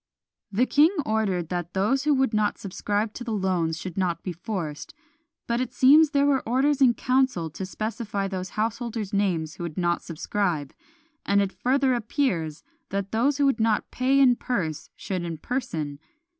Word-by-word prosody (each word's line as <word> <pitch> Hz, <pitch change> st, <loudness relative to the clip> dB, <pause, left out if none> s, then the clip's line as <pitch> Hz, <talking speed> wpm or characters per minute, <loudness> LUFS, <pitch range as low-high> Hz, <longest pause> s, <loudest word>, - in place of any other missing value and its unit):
The 220 Hz, +6 st, +2 dB
king 295 Hz, +4 st, +5 dB, 0.2 s
ordered 200 Hz, -6 st, 0 dB
that 175 Hz, 0 st, -4 dB
those 265 Hz, +9 st, +1 dB
who 300 Hz, -1 st, +4 dB
would 265 Hz, -3 st, +1 dB
not 215 Hz, -1 st, +1 dB
subscribe 205 Hz, +2 st, -2 dB
to 245 Hz, -, -7 dB
the 230 Hz, -2 st, -3 dB
loans 180 Hz, -5 st, 0 dB
should 185 Hz, +1 st, -5 dB
not 175 Hz, -3 st, -1 dB
be 180 Hz, -, -4 dB
forced; 170 Hz, -4 st, -5 dB, 0.5 s
but 235 Hz, +1 st, 0 dB
it 250 Hz, -1 st, -4 dB
seems 295 Hz, +5 st, +7 dB
there 280 Hz, -1 st, +2 dB
were 280 Hz, -2 st, +3 dB
orders 275 Hz, +3 st, +2 dB
in 245 Hz, -3 st, +6 dB
council 255 Hz, -11 st, +1 dB
to 185 Hz, +5 st, -6 dB
specify 215 Hz, -1 st, -3 dB
those 185 Hz, 0 st, -6 dB
householders' 225 Hz, -1 st, -2 dB
names 175 Hz, -6 st, 0 dB
who -, -, -6 dB
would 165 Hz, -3 st, -6 dB
not 175 Hz, -1 st, +1 dB
subscribe; 165 Hz, -3 st, -2 dB, 0.5 s
and 200 Hz, 0 st, +2 dB
it 200 Hz, -1 st, +1 dB
further 265 Hz, +1 st, +2 dB
appears 210 Hz, -, -1 dB, 0.3 s
that 200 Hz, 0 st, -3 dB
those 260 Hz, +6 st, +2 dB
who 285 Hz, -, +3 dB
would 270 Hz, -4 st, +2 dB
not 220 Hz, -1 st, +1 dB
pay 265 Hz, +2 st, +2 dB
in 250 Hz, -3 st, +5 dB
purse 160 Hz, -, -3 dB
should 185 Hz, -3 st, -4 dB
in 165 Hz, -2 st, -4 dB
person. 155 Hz, -, -3 dB
210 Hz, 175 wpm, -25 LUFS, 180-255 Hz, 0.5 s, seems